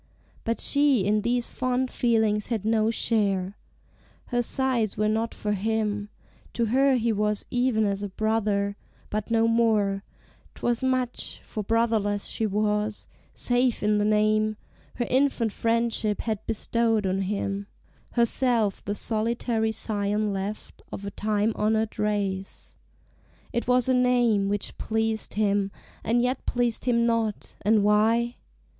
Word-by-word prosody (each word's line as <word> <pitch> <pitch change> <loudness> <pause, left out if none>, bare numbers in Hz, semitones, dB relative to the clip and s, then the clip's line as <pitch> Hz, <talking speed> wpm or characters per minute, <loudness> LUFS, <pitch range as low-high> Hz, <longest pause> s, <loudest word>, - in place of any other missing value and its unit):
But 230 0 -1
she 280 -8 +3
in 210 +1 +2
these 240 +2 -1
fond 255 0 -1
feelings 220 -3 +1
had 220 -4 -2
no 220 0 +2
share: 200 -4 0 0.7
Her 245 -1 +1
sighs 240 -4 0
were 215 - +2
not 220 +2 -1
for 210 - -2
him; 210 0 -1 0.4
to 235 - 0
her 270 0 +4
he 235 -1 +1
was 210 0 -1
Even 245 -3 +2
as 200 0 -1
a 205 - -3
brother, 205 -1 0 0.4
but 215 0 -2
no 230 0 +3
more; 215 -4 +2 0.5
'twas 240 +1 -1
much, 255 -2 -1
For 215 - -5
brotherless 215 -2 +1
she 220 - -1
was, 210 +1 -1 0.3
save 245 -1 +1
in 210 0 +3
the - - +2
name 215 0 +2 0.4
Her 240 - -1
infant 260 -4 +1
friendship 230 -1 0
had 220 -2 -3
bestowed 225 -1 +1
on 190 0 0
him; 200 0 -2 0.5
Herself 235 -3 +2
the 205 - -3
solitary 225 +1 -1
scion 210 -1 -1
left 195 +2 -5
Of 200 - -6
a 200 - -4
time 210 +1 0
honored 220 +1 0
race. 200 -2 -2 0.8
It 235 0 -1
was 250 0 +3
a 260 - +3
name 245 -5 +3
Which 205 -1 -3
pleased 220 -1 -2
him, 205 -2 +1 0.3
and 240 +2 +2
yet 250 +1 -2
pleased 240 -1 0
him 235 -2 +3
not, 230 -3 -1
and 210 0 +3
why? 225 +3 +2
220 Hz, 140 wpm, -26 LUFS, 210-235 Hz, 0.8 s, her